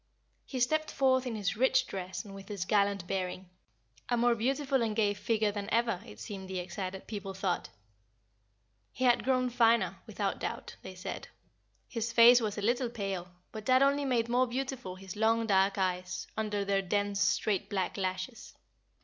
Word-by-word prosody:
He 260 - -4
stepped 310 +5 +1
forth 260 -1 +2
in 235 - -3
his 200 -2 -1
rich 260 +2 +3
dress 185 0 -5
and 200 - -10
with 195 0 -10
his 200 -3 -3
gallant 200 -2 +2
bearing, 185 -1 -3 0.6
a 240 - +2
more 240 0 +4
beautiful 265 +3 0
and 220 -2 0
gay 210 -2 +2
figure 210 +1 0
than 200 -1 -5
ever, 230 -4 +1
it 235 - -12
seemed 195 -3 -7
the 190 - -3
excited 185 +1 -5
people 200 -3 -6
thought. 190 -2 -1 1.2
He 255 - -4
had 245 -2 +4
grown 255 -1 +1
finer, 230 -6 +3
without 205 -2 -2
doubt, - - -5
they 190 - -9
said. 180 - -6 0.6
His 230 -1 -3
face 235 +1 +8
was 215 -2 -2
a 205 - -3
little 240 +3 +1
pale, 195 -6 -4 0.2
but 220 -1 -7
that 260 +1 +5
only 280 +1 +2
made 240 -4 +1
more 250 +2 +2
beautiful 255 -6 -4
his 190 -1 -9
long 225 +2 +2
dark 195 -1 +3
eyes, 185 -1 -1
under 210 -2 -1
their 195 0 +2
dense, 200 +1 -1
straight, 200 -2 +1
black 190 -2 -1
lashes. 185 +4 -4
210 Hz, 175 wpm, -31 LUFS, 195-240 Hz, 1.2 s, face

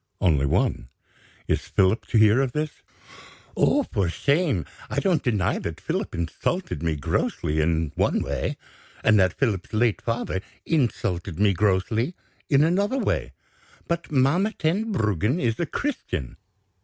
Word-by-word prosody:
"Only 75 -6 +3
one. 60 -2 0 0.6
Is - - 0
Philip 95 +3 +2
to 115 - +1
hear 110 +4 +6
of 130 -2 -1
this?" 155 0 -3 0.7
"Oh, 290 - +3
for 100 - -1
shame! 140 - +1 0.2
I - - 0
don't 180 -6 +2
deny 105 -7 0
that - - -5
Philip - - -3
insulted 85 - -2
me 80 -2 0
grossly, 75 +2 -1
in 80 -1 0
one - - +1
way; - - -2 0.5
and 110 -1 +5
that 95 -2 +2
Philip's 105 -9 -1
late 110 0 +2
father 115 -5 -2 0.2
insulted 95 - -1
me 100 -1 +4
grossly, 105 - +1 0.3
in 140 0 +5
another 200 +9 +1
way. - - -1 0.5
But 170 -1 -2
Mamma 155 +10 +2
Tenbruggen 155 - 0
is 115 -6 0
a 170 - 0
Christian. 90 - -3
115 Hz, 140 wpm, -25 LUFS, -, 0.7 s, hear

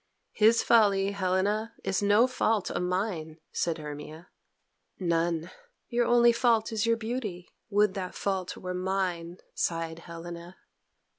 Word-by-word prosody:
"His 225 +2 +4
folly, 200 -4 +4
Helena, 200 +3 0
is 195 - 0
no 205 +3 +5
fault 225 -5 0
of - - -2
mine," 180 -4 -2
said 170 -1 -1
Hermia. 150 +2 -8 0.7
"None. 170 -1 0 0.4
Your 240 0 +1
only 240 0 +6
fault 235 -2 +2
is 220 0 0
your 230 0 +3
beauty. 220 -6 -4 0.2
Would 205 -1 +3
that 190 -2 -5
fault 190 -2 -2
were 180 0 -5
mine," 180 -2 -2 0.2
sighed 165 -1 -2
Helena. 170 +1 -9
190 Hz, 130 wpm, -28 LUFS, 170-220 Hz, 0.7 s, only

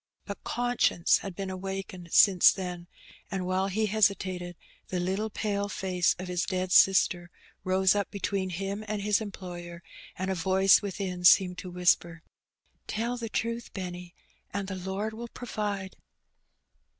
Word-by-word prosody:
But 200 - -7
conscience 245 -8 +2
had 195 -3 -7
been 195 0 -4
awakened 190 -2 -6
since 190 -4 +7
then, 180 -2 -6 0.4
and, 190 -2 -3
while 185 +1 0
he 215 +3 0
hesitated, 190 -4 0 0.3
the 185 - -3
Httle 190 +5 -1
pale 200 -1 -2
face 185 -3 0
of 185 - -6
his 180 -1 -1
dead 185 -1 -2
sister 180 -2 +4 0.3
rose 185 0 +3
up 205 -1 -1
between 195 -1 -2
him 195 +4 -4
and 210 -1 -3
his 210 +1 +2
employer, 175 -4 -8 0.3
and 185 +1 -2
a - - +1
voice 190 +2 +4
within 190 -3 -4
seemed 180 0 +5
to 185 - -7
whisper, 175 -2 +1 0.6
"Tell 235 +3 -2
the 230 -2 -5
truth, 230 +1 -3
Benny, 180 -2 -7 0.4
and 200 -1 -3
the 195 - -4
Lord 190 +4 -4
will 235 +2 -7
provide. 205 -5 -4
190 Hz, 150 wpm, -28 LUFS, 180-205 Hz, 0.6 s, since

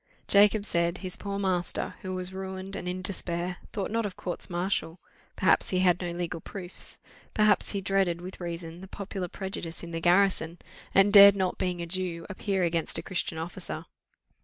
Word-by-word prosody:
Jacob 205 +1 +5
said, 170 -2 +1
his 185 -1 -3
poor 200 -1 -4
master, 185 -3 -1
who 185 -2 -4
was 185 0 -4
ruined 190 0 -5
and 180 - -5
in 185 +1 -4
despair, 180 -2 -3
thought 205 -3 -3
not 230 +1 +1
of 205 -3 -4
courts 175 - -3
martial 175 -1 -1 0.4
perhaps - - +3
he 185 - +1
had 180 -1 +3
no 175 - -2
legal 170 -1 -3
proofs 185 -1 -8 0.4
perhaps 215 -1 +3
he 200 - -1
dreaded, 190 -3 +1
with 185 +1 -8
reason, 170 0 -5
the 190 - -9
popular 195 -1 -5
prejudice 175 -3 -5
in 170 - -7
the 165 - -2
garrison, 175 -2 +3 0.4
and 195 +1 +6
dared 200 -1 +11
not, 190 -2 -1
being 180 -2 -1
a - - -2
Jew, 170 -1 -2
appear 195 -1 -1
against 165 -2 0
a - - -4
Christian 170 -3 -2
officer. 160 -1 -5
185 Hz, 185 wpm, -28 LUFS, 175-195 Hz, 0.4 s, dared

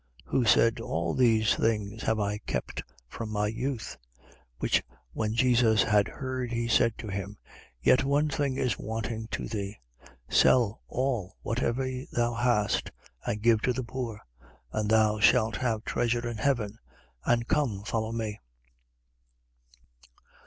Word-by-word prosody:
18:21. - - -18
Who 125 - +2
said: 115 +1 +4
All 85 -6 -2
these 110 -4 +4
things 110 -1 -1
have 110 -1 0
I 105 0 -1
kept - - -4 0.3
from 110 - -6
my 105 -1 0
youth. 115 - -3 0.3
18:22. - - -25 0.2
Which - - +1 0.3
when 110 0 -1
Jesus 115 -3 +4
had 105 -1 +3
heard, 130 -2 -4
he 120 0 -1
said 115 -1 +3
to 110 - -7
him: 100 +1 -5 0.5
Yet 130 - +5
one 140 +2 +2
thing 140 -2 -1
is 125 -7 0
wanting 110 0 -4
to - - -4
thee. 100 -2 -4 0.5
Sell 120 -4 +4
all 120 -8 -2
whatever 120 +2 -1 0.3
thou 120 0 +1
hast 120 -3 +1 0.4
and 105 0 -2
give 115 -2 +4
to 125 - +1
the 130 +1 -3
poor: 115 -3 -5 0.5
and 105 -1 -1
thou 110 -1 +3
shalt 110 +3 +4
have 115 -4 -1
treasure 120 0 0
in 120 -1 -4
heaven. 115 -3 0 0.4
And 120 0 +1
come, 120 -10 0
follow 110 +1 -2
me. 110 -2 -3
115 Hz, 145 wpm, -28 LUFS, 105-120 Hz, 0.5 s, Yet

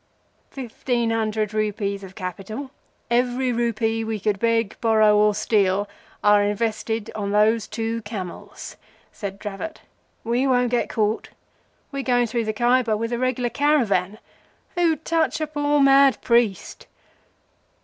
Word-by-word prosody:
"Fifteen 240 -2 -2
hundred 215 -1 -1
rupees 205 -2 -2
of 190 0 -11
capital—every 245 +5 -3
rupee 225 -1 0
we 220 -1 -3
could 205 0 -1
beg, 230 -1 +1
borrow, 215 -2 +4
or 210 0 +4
steal—are 205 0 +1
invested 220 +1 -2
on 200 -2 -3
these 215 +1 +3
two 225 +1 -3
camels," 205 -5 -8 0.3
said 195 -2 -6
Dravot. 205 +10 -6 0.4
"We 240 +4 +1
won't 245 -2 +2
get 245 - 0
caught. 215 0 -1 0.6
We're 275 -1 -3
going 245 -2 +2
through 230 0 -2
the 215 - 0
Khaiber 240 -1 +2
with 230 +2 -3
a 235 - -1
regular 255 -1 0
caravan. 225 -9 +1 0.6
Who'd 335 -3 +1
touch 325 -1 +1
a 310 - 0
poor 290 -1 0
mad 275 -1 +5
priest?" 235 -6 0
225 Hz, 130 wpm, -23 LUFS, 210-245 Hz, 0.6 s, mad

